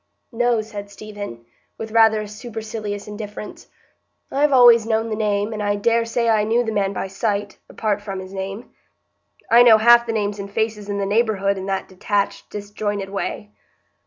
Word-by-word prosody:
"No," 240 Hz, -1 st, +1 dB
said 205 Hz, -2 st, -8 dB
Stephen, 205 Hz, -, -9 dB, 0.3 s
with 220 Hz, 0 st, -6 dB
rather 220 Hz, -1 st, +4 dB
supercilious 215 Hz, -1 st, -6 dB
indifference. 210 Hz, 0 st, -8 dB, 0.6 s
"I've 285 Hz, +1 st, +2 dB
always 240 Hz, -3 st, +7 dB
known 225 Hz, 0 st, 0 dB
the -, -, 0 dB
name, 210 Hz, 0 st, -1 dB
and 215 Hz, -, -4 dB
I 205 Hz, 0 st, 0 dB
dare 230 Hz, +3 st, +1 dB
say 235 Hz, 0 st, -1 dB
I 220 Hz, -2 st, +3 dB
knew 230 Hz, +3 st, +2 dB
the 225 Hz, -, -3 dB
man 200 Hz, -2 st, 0 dB
by 195 Hz, -, -3 dB
sight, 200 Hz, +1 st, -3 dB
apart 210 Hz, -2 st, -2 dB
from 195 Hz, -2 st, -5 dB
his 190 Hz, 0 st, -9 dB
name. 195 Hz, +4 st, -6 dB, 0.8 s
I 235 Hz, +1 st, +8 dB
know 235 Hz, -3 st, +8 dB
half 235 Hz, +2 st, +6 dB
the -, -, -1 dB
names 205 Hz, -1 st, -2 dB
and 200 Hz, 0 st, -6 dB
faces 210 Hz, -1 st, -2 dB
in 200 Hz, -, -2 dB
the 200 Hz, -, -1 dB
neighbourhood 200 Hz, -2 st, +1 dB
in 190 Hz, 0 st, -6 dB
that 195 Hz, -1 st, -2 dB
detached, 200 Hz, +2 st, -2 dB
disjointed 205 Hz, -1 st, -4 dB
way." 205 Hz, +1 st, -4 dB
210 Hz, 175 wpm, -21 LUFS, 200-225 Hz, 0.8 s, I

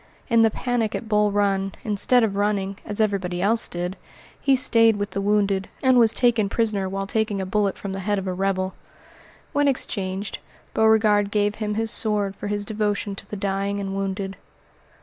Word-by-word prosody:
In 230 Hz, 0 st, +5 dB
the 225 Hz, -, +5 dB
panic 230 Hz, -1 st, -1 dB
at 230 Hz, -, -5 dB
Bull 210 Hz, -1 st, +2 dB
Run, 195 Hz, -1 st, 0 dB
instead 225 Hz, +3 st, +3 dB
of 205 Hz, -3 st, 0 dB
running, 200 Hz, -1 st, 0 dB
as 205 Hz, 0 st, -5 dB
everybody 195 Hz, -4 st, 0 dB
else 220 Hz, +5 st, +1 dB
did, 175 Hz, +2 st, -4 dB, 0.5 s
he 275 Hz, -1 st, +4 dB
stayed 230 Hz, -3 st, +4 dB
with 205 Hz, 0 st, -3 dB
the 200 Hz, -, -2 dB
wounded, 200 Hz, -1 st, +1 dB
and 260 Hz, -1 st, +5 dB
was 225 Hz, -2 st, +5 dB
taken 230 Hz, -4 st, +2 dB
prisoner 205 Hz, -4 st, 0 dB
while 195 Hz, +1 st, -3 dB
taking 215 Hz, 0 st, -1 dB
a 190 Hz, -, -2 dB
bullet 200 Hz, +1 st, 0 dB
from 200 Hz, -1 st, -5 dB
the 195 Hz, -, -4 dB
head 205 Hz, +2 st, -1 dB
of 195 Hz, -, -3 dB
a 185 Hz, -, -2 dB
rebel. 190 Hz, 0 st, -1 dB, 0.8 s
When 290 Hz, 0 st, +2 dB
exchanged, 200 Hz, -7 st, -2 dB, 0.3 s
Beauregard 215 Hz, -2 st, +4 dB
gave 205 Hz, 0 st, +1 dB
him 210 Hz, -1 st, -1 dB
his 225 Hz, +1 st, 0 dB
sword 205 Hz, -4 st, 0 dB
for 205 Hz, -, -6 dB
his 205 Hz, 0 st, -2 dB
devotion 210 Hz, -1 st, -1 dB
to 195 Hz, 0 st, -10 dB
the -, -, -5 dB
dying 200 Hz, 0 st, -2 dB
and 195 Hz, -1 st, -4 dB
wounded. 195 Hz, 0 st, -3 dB
205 Hz, 190 wpm, -23 LUFS, 195-220 Hz, 0.8 s, In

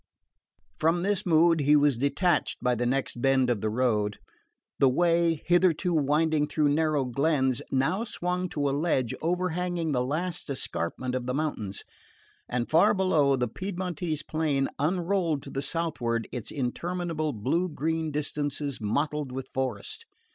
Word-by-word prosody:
From 165 Hz, +2 st, +2 dB
this 200 Hz, 0 st, 0 dB
mood 165 Hz, 0 st, +5 dB
he 145 Hz, +1 st, +4 dB
was 145 Hz, -2 st, +4 dB
detached 170 Hz, +6 st, +1 dB
by 125 Hz, 0 st, +1 dB
the 120 Hz, 0 st, -1 dB
next 130 Hz, -1 st, -1 dB
bend 130 Hz, -1 st, +3 dB
of 110 Hz, -5 st, -1 dB
the 110 Hz, -, 0 dB
road. 105 Hz, -3 st, 0 dB, 0.6 s
The 135 Hz, -, +6 dB
way, 170 Hz, +2 st, +2 dB
hitherto 175 Hz, 0 st, +3 dB
winding 150 Hz, 0 st, +2 dB
through 150 Hz, -1 st, +1 dB
narrow 150 Hz, -2 st, +1 dB
glens, 135 Hz, 0 st, +1 dB
now 135 Hz, +11 st, +1 dB
swung 180 Hz, -3 st, -2 dB
to 145 Hz, -3 st, -1 dB
a -, -, +1 dB
ledge 140 Hz, -5 st, 0 dB
overhanging 175 Hz, -1 st, -1 dB
the 125 Hz, -3 st, +1 dB
last 165 Hz, +6 st, -3 dB
escarpment 125 Hz, -1 st, -3 dB
of 130 Hz, -1 st, -3 dB
the 125 Hz, -, -1 dB
mountains; 115 Hz, -10 st, -3 dB, 0.7 s
and 120 Hz, -1 st, -1 dB
far 165 Hz, +6 st, +4 dB
below, 155 Hz, -8 st, +3 dB
the 125 Hz, -1 st, 0 dB
Piedmontese 175 Hz, -, -4 dB
plain 150 Hz, -4 st, 0 dB
unrolled 170 Hz, -1 st, 0 dB
to 140 Hz, -, -9 dB
the 135 Hz, -, -2 dB
southward 135 Hz, -7 st, -2 dB
its 125 Hz, -4 st, -5 dB
interminable 155 Hz, +3 st, -2 dB
blue 145 Hz, -, 0 dB
green 160 Hz, +1 st, -1 dB
distances 145 Hz, -2 st, -3 dB
mottled 145 Hz, +5 st, -1 dB
with 130 Hz, 0 st, -6 dB
forest. 130 Hz, -6 st, -3 dB
150 Hz, 145 wpm, -27 LUFS, 130-170 Hz, 0.7 s, The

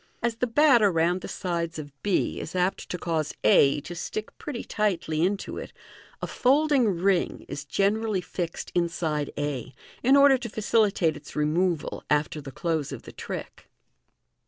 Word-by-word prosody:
As 235 Hz, -1 st, 0 dB
the 250 Hz, -, 0 dB
batter 240 Hz, -5 st, +5 dB
round 170 Hz, +2 st, +1 dB
the -, -, -6 dB
sides 170 Hz, -3 st, -3 dB
of 145 Hz, -2 st, -7 dB
b 200 Hz, -3 st, 0 dB
is 160 Hz, -, -7 dB
apt 180 Hz, +1 st, 0 dB
to 180 Hz, -, -3 dB
cause 160 Hz, -3 st, -2 dB
a 140 Hz, +7 st, +5 dB
to 170 Hz, -, -8 dB
stick 215 Hz, +5 st, -5 dB
pretty 275 Hz, -6 st, -5 dB
tightly 175 Hz, -7 st, -1 dB
into 195 Hz, +2 st, -1 dB
it, -, -, -8 dB, 0.5 s
a -, -, +2 dB
folding 280 Hz, 0 st, +3 dB
ring 185 Hz, -1 st, +1 dB
is 145 Hz, -, -6 dB
generally 205 Hz, +5 st, +1 dB
fixed 175 Hz, -1 st, -5 dB
inside 165 Hz, -4 st, 0 dB
a, 140 Hz, -3 st, -3 dB, 0.3 s
in 265 Hz, +3 st, +5 dB
order 280 Hz, -2 st, +6 dB
to 240 Hz, -2 st, -5 dB
facilitate 210 Hz, -6 st, +2 dB
its -, -, -11 dB
removal 160 Hz, +2 st, 0 dB
after 150 Hz, +1 st, +1 dB
the 135 Hz, -1 st, -8 dB
close 160 Hz, 0 st, -2 dB
of -, -, -7 dB
the -, -, -10 dB
trick. -, -, -7 dB
180 Hz, 160 wpm, -26 LUFS, 155-215 Hz, 0.5 s, order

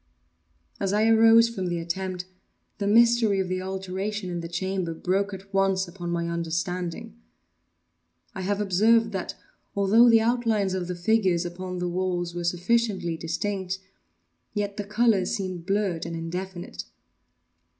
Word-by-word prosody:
As 195 Hz, 0 st, 0 dB
I 215 Hz, +2 st, +3 dB
arose 225 Hz, +1 st, +6 dB
from 195 Hz, -6 st, -4 dB
the 175 Hz, -1 st, -1 dB
attempt, 180 Hz, +2 st, -3 dB, 0.5 s
the 200 Hz, -, -1 dB
mystery 230 Hz, -2 st, +4 dB
of 190 Hz, -1 st, -1 dB
the 185 Hz, 0 st, -1 dB
alteration 190 Hz, +1 st, -4 dB
in 175 Hz, -, -3 dB
the 170 Hz, -, -5 dB
chamber 180 Hz, -1 st, -2 dB
broke 195 Hz, +4 st, 0 dB
at 195 Hz, +1 st, -10 dB
once 195 Hz, -1 st, +2 dB
upon 175 Hz, 0 st, -7 dB
my 170 Hz, 0 st, -1 dB
understanding. 170 Hz, +6 st, -3 dB, 1.1 s
I 190 Hz, -, -5 dB
have 200 Hz, +2 st, -1 dB
observed 220 Hz, +3 st, +3 dB
that, 190 Hz, -3 st, -4 dB, 0.4 s
although 210 Hz, +5 st, +5 dB
the 230 Hz, -1 st, +7 dB
outlines 225 Hz, -4 st, +1 dB
of 185 Hz, -2 st, -2 dB
the 180 Hz, -, -3 dB
figures 185 Hz, -2 st, +2 dB
upon 180 Hz, +1 st, -5 dB
the 180 Hz, 0 st, -2 dB
walls 175 Hz, -1 st, -2 dB
were 175 Hz, 0 st, -4 dB
sufficiently 180 Hz, 0 st, 0 dB
distinct, 185 Hz, +3 st, -3 dB, 0.8 s
yet 205 Hz, -1 st, -2 dB
the 205 Hz, -, -3 dB
colors 215 Hz, -2 st, +2 dB
seemed 185 Hz, -3 st, -5 dB
blurred 195 Hz, -5 st, 0 dB
and 165 Hz, -, -5 dB
indefinite. 175 Hz, +2 st, -5 dB
190 Hz, 145 wpm, -26 LUFS, 175-210 Hz, 1.1 s, the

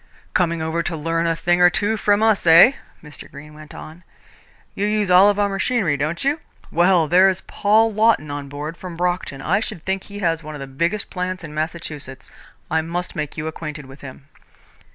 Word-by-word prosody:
"Coming 170 Hz, -2 st, 0 dB
over 160 Hz, +1 st, -1 dB
to 165 Hz, -1 st, -3 dB
learn 165 Hz, +2 st, -1 dB
a 165 Hz, -, +1 dB
thing 175 Hz, +2 st, +1 dB
or 180 Hz, -, +8 dB
two 205 Hz, +4 st, 0 dB
from 205 Hz, 0 st, +2 dB
us, 220 Hz, -5 st, +2 dB
eh?" 165 Hz, +9 st, +8 dB, 0.3 s
Mr. 150 Hz, -1 st, -11 dB
Greene 150 Hz, +2 st, -12 dB
went 155 Hz, 0 st, -13 dB
on. 160 Hz, +3 st, -11 dB, 0.7 s
"You 205 Hz, -, -1 dB
use 210 Hz, -3 st, 0 dB
all 185 Hz, +3 st, +7 dB
our 205 Hz, -, +3 dB
machinery, 195 Hz, -4 st, 0 dB
don't 155 Hz, +4 st, -3 dB
you? 290 Hz, +3 st, +1 dB, 0.3 s
Well, 175 Hz, -1 st, +3 dB
there's 185 Hz, +3 st, +4 dB
Paul 220 Hz, +2 st, +2 dB
Lawton 215 Hz, -9 st, +2 dB
on 145 Hz, -1 st, -6 dB
board, 150 Hz, +4 st, -6 dB
from 180 Hz, -3 st, -8 dB
Brockton. 175 Hz, -6 st, -2 dB
I 195 Hz, +5 st, +1 dB
should 215 Hz, -6 st, -6 dB
think 190 Hz, 0 st, -3 dB
he 205 Hz, -, -10 dB
has 165 Hz, -4 st, 0 dB
one 155 Hz, -1 st, -8 dB
of -, -, -8 dB
the 135 Hz, -, -6 dB
biggest 170 Hz, +10 st, -2 dB
plants 185 Hz, 0 st, -4 dB
in 155 Hz, -2 st, -8 dB
Massachusetts. 155 Hz, -4 st, -6 dB, 0.4 s
I 160 Hz, 0 st, +2 dB
must 175 Hz, +3 st, -5 dB
make 150 Hz, -3 st, -5 dB
you 155 Hz, -, -4 dB
acquainted 155 Hz, -2 st, -6 dB
with 135 Hz, +2 st, -14 dB
him." 135 Hz, 0 st, -11 dB
170 Hz, 195 wpm, -21 LUFS, 155-195 Hz, 0.7 s, or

